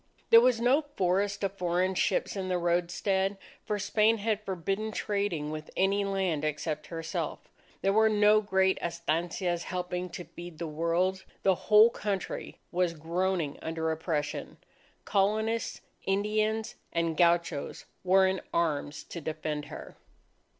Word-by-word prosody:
There 230 - +10
was 245 -2 +3
no 250 +6 +4
forest 195 +3 +1
of 195 - +1
foreign 180 +1 +1
ships 185 - 0
in 190 -1 -3
the 180 -1 +1
roadstead; 180 +3 0 0.3
for 210 - -2
Spain 215 +2 +3
had 215 0 -1
forbidden 195 +3 -2
trading 200 -8 -1
with 155 0 -6
any 195 +2 +2
land 190 -6 -1
except 155 0 -2
herself. 165 -1 -3 0.5
There 195 - +3
were 220 +1 +5
no 210 0 +5
great 190 -2 +2
estancias 170 +1 -1
helping 180 0 -3
to 175 - -7
feed 175 -2 -10
the 170 - -4
world. 170 +4 0 0.2
The 190 - +5 0.2
whole 215 +2 +8
country 200 -4 -4
was 175 -1 +1
groaning 170 -1 -1
under 160 0 -2
oppression. 155 -2 -3 0.5
Colonists, 220 +3 0 0.3
Indians, 215 +2 0 0.2
and 165 -1 0
gauchos, 170 -3 +1 0.2
were 190 +1 +5
in 190 0 0
arms 150 -3 -1
to 170 - -8
defend 155 -1 -3
her. - - -10
185 Hz, 135 wpm, -29 LUFS, 165-205 Hz, 0.5 s, There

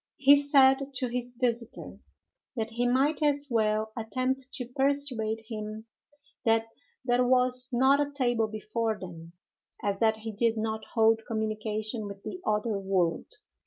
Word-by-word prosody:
He 280 +1 +7
said 275 -1 +4
to 250 -1 0
his 245 0 -5
visiter, 235 -2 -3 0.6
that 225 -1 -3
he 240 +2 0
might 275 +5 +2
as 290 -1 +1
well 215 -1 +1
attempt 255 +3 -2
to 250 - -3
persuade 250 -4 -1
him 215 0 -6 0.6
that 225 0 +3 0.4
that 245 0 +3
was 255 0 +3
not 265 +3 +4
a 290 0 -2
table 240 -5 +1
before 215 +1 -2
them, 170 -2 -10 0.5
as 200 -1 -1
that 220 -1 +3
he 220 +1 -6
did 225 +2 0
not 220 0 -3
hold 225 0 +4
communication 215 0 -3
with 200 0 -10
the 365 - -7
other 210 0 0
world. 185 -4 0
230 Hz, 145 wpm, -28 LUFS, 215-255 Hz, 0.6 s, He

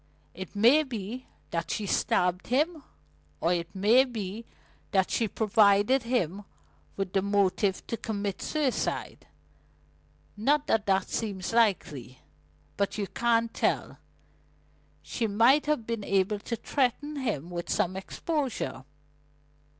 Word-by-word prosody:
It 190 +1 -8
may 240 +9 +6
be 245 -2 -6 0.2
that 165 0 -2
she 210 - -2
stabbed 180 -1 +1
him, 305 +5 +1 0.6
or 170 +3 +2
it 170 0 -4
may 215 +7 +5
be 225 -3 -5 0.4
that 190 -2 +1
she 230 - +1
provided 210 +4 +3
him 205 -6 -1 0.5
with 195 -2 -3
the 195 - +3
motive 200 -1 +1
to 230 - -3
commit 205 -3 -3
suicide 295 -5 -2 1.1
not 285 +8 +2
that 215 -2 +1
that 190 -1 +2
seems 200 -2 -3
likely. 150 - +1 0.6
But 200 +2 -1
you 205 - -1
can't 230 +3 +1
tell: - - -1 1.0
she 230 - -2
might 235 +9 +4
have 300 -7 0
been 230 -2 -3
able 200 +1 +1
to 235 - -4
threaten 285 +5 -1
him 190 - -3
with 175 -1 -5
some 185 -3 0
exposure. 250 - -3
210 Hz, 125 wpm, -28 LUFS, 190-240 Hz, 1.1 s, may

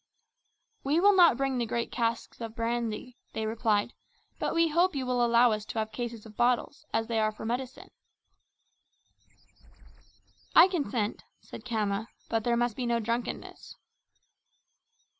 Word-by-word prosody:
"We 290 +4 +2
will 405 +2 +5
not 345 -9 +6
bring 270 -1 0
the 235 - -1
great 235 +1 -2
casks 230 -1 -2
of 225 -1 -6
brandy," 235 +1 -3
they 220 - -2
replied, 220 -1 0 0.5
"but - - -1
we 335 0 +4
hope 345 +2 +2
you 265 -2 -2
will 250 -1 +1
allow 235 0 +5
us 215 -1 -2
to - - -7
have 220 0 -1
cases 230 -1 -5
of 215 -1 -13
bottles 250 +6 0
as 225 0 0
they 225 -1 -1
are 215 0 +2
for 215 - -9
medicine." 250 +3 -4 2.6
"I - - +9
consent," 245 - -2 0.2
said 225 - -11
Khama, 215 -2 -1 0.2
"but 225 -1 0
there 235 0 +1
must 240 -2 0
be 250 -2 -3
no 235 0 +1
drunkenness." 230 +2 -4
235 Hz, 150 wpm, -29 LUFS, 220-255 Hz, 2.6 s, I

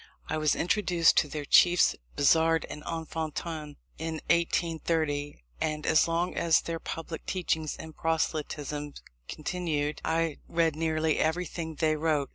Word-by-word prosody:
I 155 - -1
was 155 -1 +2
introduced 175 -2 +3
to 150 - +4
their 150 0 -5
chiefs, 175 +4 +5 0.2
Bazard 160 +2 +4
and 150 - -7
Enfantin, 160 -2 -4 0.2
in 160 0 -3 0.2
1830; 160 - 0 0.2
and 150 0 -1
as 160 - +4
long 170 +2 0
as 165 -1 +3
their 165 -1 -4
public 165 0 -6
teachings 160 -4 -1
and 160 -1 -9
proselytism 150 -2 -2 0.3
continued, 155 -2 -2
I 165 -2 0
read 165 -2 +1
nearly 160 -1 0
everything 160 0 -1
they 155 0 +1
wrote. 150 -3 0
160 Hz, 130 wpm, -29 LUFS, 150-165 Hz, 0.3 s, chiefs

